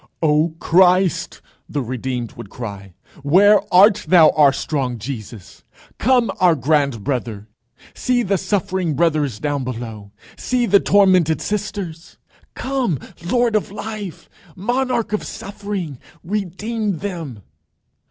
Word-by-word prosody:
"O 155 +1 +2
Christ!" 180 +1 +2 0.3
the 145 -2 -2
redeemed 125 -1 -4
would 100 - -11
cry, 100 -6 -8 0.3
"where 195 +9 +5
art 205 +3 +6
thou, 170 -4 +7
our 145 -3 +5
strong 135 -4 -2
Jesus? 110 -4 -8 0.4
Come, 245 -4 +3
our 180 -3 +5
grand 140 -5 0
brother. 115 -5 -3 0.5
See 245 -1 0
the 195 -2 0
suffering 190 -4 -1
brothers 150 -8 +1
down 145 -2 -2
below! 115 -5 -7 0.2
See 250 -1 0
the 200 -2 +5
tormented 185 -6 +3
sisters! 200 -5 -5 0.4
Come, 260 - -1 0.3
Lord 235 +4 +1
of 215 - 0
Life! 210 -3 -7 0.3
Monarch 240 +2 -1
of 210 - -1
Suffering! 195 -8 -6 0.2
Redeem 205 +2 -3
them. 160 - -6
175 Hz, 115 wpm, -20 LUFS, 135-205 Hz, 0.5 s, thou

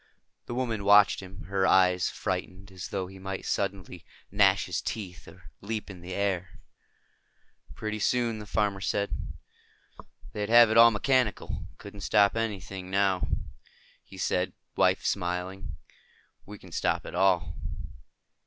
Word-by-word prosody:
The 120 - -4
woman 115 -5 -2
watched 100 0 +6
him, 95 +1 -10
her 95 0 0
eyes 90 -1 +4
frightened 95 0 -4
as 90 -2 -7
though 95 -2 -3
he 95 +1 -12
might 95 0 -5
suddenly 95 -3 -3 0.3
gnash - - +4
his - - -2
teeth 95 -6 -6
or - - -15
leap 105 0 -4
in 90 -2 -12
the 90 +1 -6
air. 95 -3 -2 1.2
"Pretty 110 0 -4
soon," 115 0 +1
the 105 - -9
farmer 100 -2 0
said, 100 +1 -1 1.2
"they'd 105 0 -3
have 120 -1 +7
it 110 - +3
all 115 0 +10
mechanical. 115 +1 0
Couldn't 100 0 -11
stop 100 +1 +3
anything. 95 -4 -4
Now," 95 -1 +1 0.8
he 95 - -14
said, 90 0 0 0.5
smiling 90 +2 -2
at - - -17
his - - -7
wife, 80 - -8 0.7
"we 105 +1 -9
can 95 -2 -15
stop - - -1
it - - -8
all." 90 -4 +2
95 Hz, 145 wpm, -28 LUFS, 95-105 Hz, 1.2 s, all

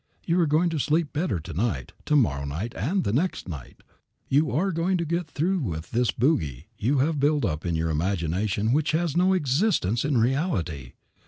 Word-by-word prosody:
You 170 +1 +2
are 170 - +3
going 160 +4 +2
to 160 - -1
sleep 155 +2 +1
better 155 - -1
to 80 - -8
night, 85 - -2
to 150 - +2
morrow 70 - +2
night, 80 +12 -4
and 175 - 0
the 100 - -1
next 165 - -1
night. 75 -8 -9 0.5
You 145 +3 +3
are 190 +6 +1
going 175 +3 0
to 170 - -2
get 170 +1 -1
through 180 +7 0
with 85 - -4
this 120 -1 +1
bogie 80 - 0
you 125 +7 0
have 150 +3 +1
built 145 -1 +2
up 80 -2 -2
in 85 - 0
your 80 0 0
imagination 95 +6 0
which 155 +1 +1
has 165 -2 0
no 185 +2 +4
existence 145 - +1
in 145 -3 +1
reality. 110 - -1
135 Hz, 195 wpm, -26 LUFS, -, 0.5 s, no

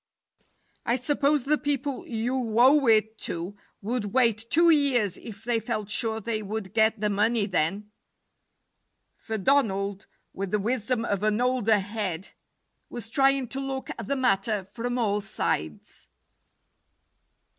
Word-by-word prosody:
"I 235 - +1
suppose 280 +2 +1
the 300 +3 +1
people 285 -2 -2
you 235 0 -2
owe 270 +2 +5
it 220 0 +3
to 175 +4 -1 0.3
would 210 -2 -3
wait 230 -3 +2
two 335 +4 +5
years 260 - +2
if 220 -1 -10
they 235 -1 +1
felt 215 -2 -4
sure 220 0 +1
they 220 0 -3
would 210 -1 -5
get 220 0 +2
the 210 0 0
money 210 +2 +1
then 195 +3 -1 1.2
for 220 -1 -5
Donald, 200 -4 0 0.3
with 195 0 -4
the 210 - +1
wisdom 230 +2 -1
of 200 -3 -1
an 215 +1 +1
older 245 -4 +2
head, 200 -3 -3 0.6
was 225 -2 -8
trying 270 0 +2
to 270 - -5
look 270 -1 -4
at 230 - -7
the 280 - 0
matter 210 -5 +1
from 240 +5 -4
all 210 -3 0
sides. 80 - -4
225 Hz, 140 wpm, -26 LUFS, 205-255 Hz, 1.2 s, owe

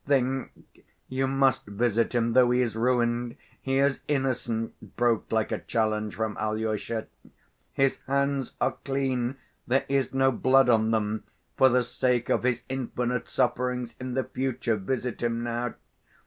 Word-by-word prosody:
Think—you 135 0 -2
must 135 -3 +2
visit 115 +3 0
him; 115 -1 +2
though 125 -1 +6
he 125 +1 +3
is 115 -4 -1
ruined, 120 0 +1 0.3
he 135 0 0
is 140 0 +2
innocent," 125 -5 -2
broke 120 -2 +1
like 110 -1 +1
a - - -1
challenge 110 -2 -1
from 110 +1 -2
Alyosha. 110 +1 -2 0.7
"His 135 -1 +2
hands 140 -1 0
are - - 0
clean, 135 -2 -1 0.3
there 130 +2 +2
is 135 -2 +1
no 135 0 +3
blood 130 +1 +4
on 110 -2 +4
them! 110 -1 0 0.3
For 130 - +6
the 125 0 +3
sake 120 0 0
of - - +2
his 125 -1 0
infinite 125 -2 -2
sufferings 125 -1 0
in 130 -1 -4
the 130 - +1
future 130 -3 -1
visit 125 +4 -3
him 115 0 -1
now. 120 0 -2
125 Hz, 150 wpm, -27 LUFS, 115-130 Hz, 0.7 s, though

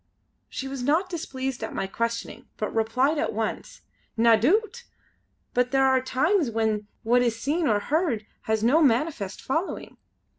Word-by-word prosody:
She 270 - -5
was 270 -1 -5
not 315 +9 +1
displeased 265 -7 -4
at 220 - -5
my 195 - -1
questioning 230 +4 -4
but 215 - -3
replied 255 +7 +1
at - - -1
once: 220 0 -4 0.4
"Na 230 0 +6
doot! 425 - +1 0.7
but 250 0 +2
there 270 0 +3
are 260 -1 +4
times 300 - +1
when 220 -2 -1 0.2
what 245 +2 +3
is 235 -2 0
seen 300 +6 0
or 210 -4 +3
heard 280 - 0 0.2
has 220 0 0
no 280 +8 +4
manifest 245 - +1
following. 320 +8 -3
255 Hz, 155 wpm, -25 LUFS, 225-300 Hz, 0.7 s, Na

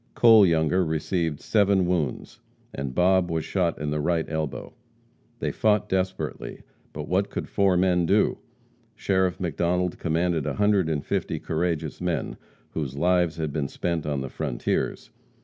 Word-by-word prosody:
Cole 110 -4 +7
Younger 85 +2 +2
received 80 -1 -1
seven 100 -3 +2
wounds, 85 -7 -2 0.3
and 70 -1 -5
Bob 90 0 +3
was 80 -1 -2
shot 90 -4 0
in 75 -1 -2
the 75 - -1
right 80 +1 0
elbow. 80 -5 -4 0.6
They - - -2
fought 105 -2 +1
desperately, 95 -7 -3 0.3
but 75 0 -6
what 95 +2 +1
could - - -5
four 95 -3 +2
men 90 -2 +2
do? - - +2 0.6
Sheriff 95 -2 0
McDonald 90 +1 -1
commanded 80 -1 0
a - - -2
hundred 105 -5 +2
and 75 -3 -2
fifty - - -2
courageous 80 -3 -2
men, 90 -2 -2 0.4
whose 70 -4 -4
lives 90 0 +2
had 80 -3 -3
been 75 -3 -1
spent 85 +1 -3
on 70 -2 -1
the 65 - -5
frontiers. - - -2
85 Hz, 150 wpm, -25 LUFS, 75-95 Hz, 0.6 s, Cole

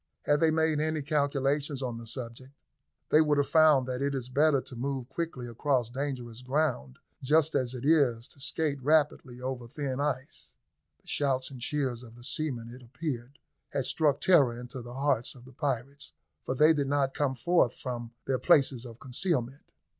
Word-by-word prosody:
Had 145 0 +3
they 160 - +4
made 160 -1 +2
any 155 -1 -1
calculations 145 -1 0
on 120 -2 -3
the 115 - -9
subject, 125 +2 -7 0.6
they 155 - +6
would 150 -2 +2
have 145 - +2
found 155 -5 +5
that 130 0 -3
it 140 0 0
is 125 -2 -4
better 145 +2 +3
to 130 - -9
move 130 0 -3
quickly 165 -7 -4
across 125 0 0
dangerous 125 -3 -4
ground 130 - -1 0.2
just 155 +3 +3
as 130 -1 0
it 125 +1 -6
is 135 -7 +3
to 140 - -16
skate 145 0 -1
rapidly 145 -3 +1
over 125 -1 -4
thin 135 +1 -3
ice. 140 -2 -3 0.4
The - - -35
shouts 135 -2 0
and 130 -2 -10
cheers 135 -3 -1
of 115 -2 -13
the 120 - -14
seamen, 120 -3 -3
it 125 +2 -11
appeared, 130 +1 -5 0.4
had 135 - 0
struck 145 0 +2
terror 140 -10 +4
into 125 +1 -7
the 120 +1 -9
hearts 135 -3 0
of 125 -1 -14
the 130 - -14
pirates, 140 +1 -3 0.3
for 130 - -1
they 155 +4 +6
did 145 -3 -1
not 140 -1 +1
come 140 -3 0
forth 130 0 +2
from 120 -2 -5 0.2
their 130 -2 0
places 135 -7 +3
of 115 0 -12
concealment. 135 -1 -2
135 Hz, 185 wpm, -29 LUFS, 125-145 Hz, 0.6 s, they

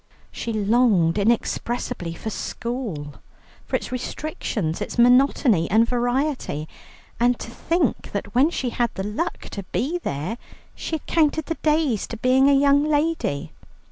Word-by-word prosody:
She 230 - -4
longed 210 -5 +3
inexpressibly 220 -5 -1
for 220 - -5
school, 210 - -4 0.5
for - - -1
its - - -3
restrictions, 240 - -3
its - - -4
monotony 245 - +4
and 225 +3 +4
variety. 245 - -1 0.5
And 240 +1 +3
to 230 - -8
think 335 +8 -1
that - - -4
when 265 +6 +4
she 260 -7 -2
had 240 0 +1
the 190 - -3
luck 270 +12 -3
to 200 - -4
be 330 +7 -1
there, 165 - -4 0.3
she 325 - -4
had 315 - -7
counted 315 -1 +2
the 330 - -3
days 300 -8 +1
to 230 - -6
being 260 +4 +4
a - - +5
young 285 0 +4
lady. 295 - 0
245 Hz, 145 wpm, -23 LUFS, 210-285 Hz, 0.5 s, a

